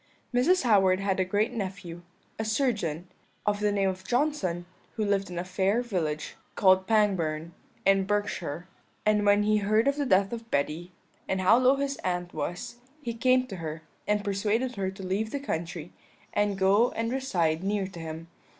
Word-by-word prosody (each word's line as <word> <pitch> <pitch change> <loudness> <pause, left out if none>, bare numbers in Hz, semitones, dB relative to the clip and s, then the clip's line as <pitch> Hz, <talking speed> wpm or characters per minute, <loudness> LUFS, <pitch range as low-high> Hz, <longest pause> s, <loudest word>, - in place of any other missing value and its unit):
"Mrs. 275 +9 +3
Howard 190 -5 +4
had 195 -1 0
a - - +4
great 205 +5 0
nephew, 190 -5 -5 0.4
a - - 0
surgeon, 210 - -1 0.4
of 205 0 +1
the 210 0 +1
name 200 -1 +1
of 185 0 -5
Johnson, 240 - 0 0.3
who 220 -2 0
lived 200 -1 0
in 175 - -6
a 175 - -1
fair 190 +5 +1
village, 160 -9 -2 0.2
called 190 -1 +4
Pangbourne, 170 -7 +1 0.3
in 195 0 +4
Berkshire; 185 -5 -2 0.4
and 210 -1 +3
when 205 +1 +5
he 215 +1 +3
heard 215 +4 +2
of 280 +1 +2
the 285 -2 0
death 195 0 +3
of 230 -1 -7
Betty, 160 +4 -1 0.4
and 190 - 0
how 185 +3 +5
low 255 +2 +5
his 275 0 -2
aunt 175 -1 -3
was, 175 +9 -4 0.3
he 235 - -3
came 255 +2 +3
to 195 -6 -7
her, 160 -1 -6 0.2
and 210 0 +1
persuaded 215 +5 0
her 190 -1 -1
to 190 0 -9
leave 195 +4 -1
the 285 - -3
country, 170 - -4 0.4
and 205 -1 +1
go 200 +5 +4
and 230 +1 -2
reside 175 -11 0
near 200 0 0
to 185 -2 -9
him. 160 0 -7
195 Hz, 180 wpm, -28 LUFS, 180-220 Hz, 0.4 s, when